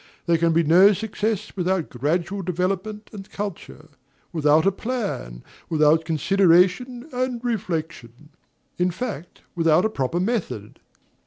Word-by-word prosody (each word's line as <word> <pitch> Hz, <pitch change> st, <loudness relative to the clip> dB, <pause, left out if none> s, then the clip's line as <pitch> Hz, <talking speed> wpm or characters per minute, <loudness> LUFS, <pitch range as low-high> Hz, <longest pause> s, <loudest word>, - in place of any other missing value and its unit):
There 170 Hz, -1 st, +2 dB
can 165 Hz, 0 st, +3 dB
be 165 Hz, +1 st, +3 dB
no 180 Hz, +6 st, +6 dB
success 215 Hz, +1 st, -3 dB
without 185 Hz, -2 st, -1 dB
gradual 170 Hz, +9 st, -1 dB
development 190 Hz, +4 st, -3 dB
and 200 Hz, -1 st, -9 dB
culture, 200 Hz, -, -7 dB, 0.4 s
without 155 Hz, 0 st, +3 dB
a 195 Hz, -, +4 dB
plan, 195 Hz, -, -4 dB, 0.3 s
without 155 Hz, 0 st, +3 dB
consideration 190 Hz, -, +2 dB
and 250 Hz, -1 st, -1 dB
reflection, 160 Hz, -, -4 dB, 0.5 s
in 180 Hz, +1 st, +2 dB
fact, 180 Hz, -, -6 dB
without 165 Hz, +1 st, +3 dB
a -, -, +2 dB
proper 140 Hz, +1 st, -1 dB
method. 180 Hz, -, -3 dB
180 Hz, 120 wpm, -23 LUFS, 160-205 Hz, 0.5 s, no